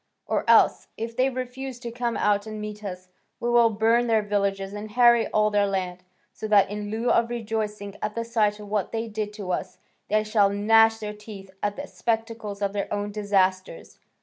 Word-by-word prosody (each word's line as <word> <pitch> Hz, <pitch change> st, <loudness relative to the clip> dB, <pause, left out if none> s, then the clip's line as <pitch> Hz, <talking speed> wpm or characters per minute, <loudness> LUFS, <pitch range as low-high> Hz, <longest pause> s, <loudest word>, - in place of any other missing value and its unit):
Or -, -, -1 dB
else, -, -, +5 dB
if 230 Hz, +1 st, -5 dB
they 255 Hz, +2 st, +2 dB
refuse 255 Hz, 0 st, -6 dB
to 235 Hz, -, -5 dB
come 240 Hz, 0 st, -2 dB
out 205 Hz, 0 st, +1 dB
and 215 Hz, 0 st, -6 dB
meet 210 Hz, 0 st, -7 dB
us, 185 Hz, -2 st, -7 dB, 0.3 s
we 240 Hz, -, -1 dB
will 235 Hz, -1 st, +5 dB
burn 225 Hz, +3 st, +2 dB
their 220 Hz, -2 st, +2 dB
villages 200 Hz, -1 st, -1 dB
and 210 Hz, +1 st, -6 dB
harry 235 Hz, +1 st, +5 dB
all 215 Hz, 0 st, +2 dB
their 205 Hz, -1 st, +2 dB
land, 185 Hz, -2 st, -3 dB, 0.3 s
so 220 Hz, -, -6 dB
that 205 Hz, -2 st, +4 dB
in 205 Hz, 0 st, -4 dB
lieu 225 Hz, +3 st, 0 dB
of 235 Hz, 0 st, +3 dB
rejoicing 215 Hz, -3 st, -4 dB
at 210 Hz, 0 st, -3 dB
the 230 Hz, 0 st, -2 dB
sight 215 Hz, -3 st, +1 dB
of 210 Hz, -, -9 dB
what 205 Hz, -2 st, -1 dB
they 225 Hz, 0 st, -2 dB
did 210 Hz, -1 st, -4 dB
to 200 Hz, -3 st, -5 dB
us, -, -, -3 dB, 0.3 s
they 215 Hz, +1 st, +2 dB
shall 215 Hz, -2 st, +3 dB
gnash 225 Hz, +2 st, +4 dB
their 210 Hz, -1 st, -5 dB
teeth 210 Hz, -2 st, -11 dB
at 205 Hz, 0 st, -1 dB
the 285 Hz, -, -6 dB
spectacle 225 Hz, -4 st, -3 dB
of 200 Hz, -1 st, -1 dB
their 200 Hz, -1 st, -3 dB
own 205 Hz, 0 st, -2 dB
disasters. 195 Hz, -3 st, -1 dB
210 Hz, 200 wpm, -25 LUFS, 205-230 Hz, 0.3 s, else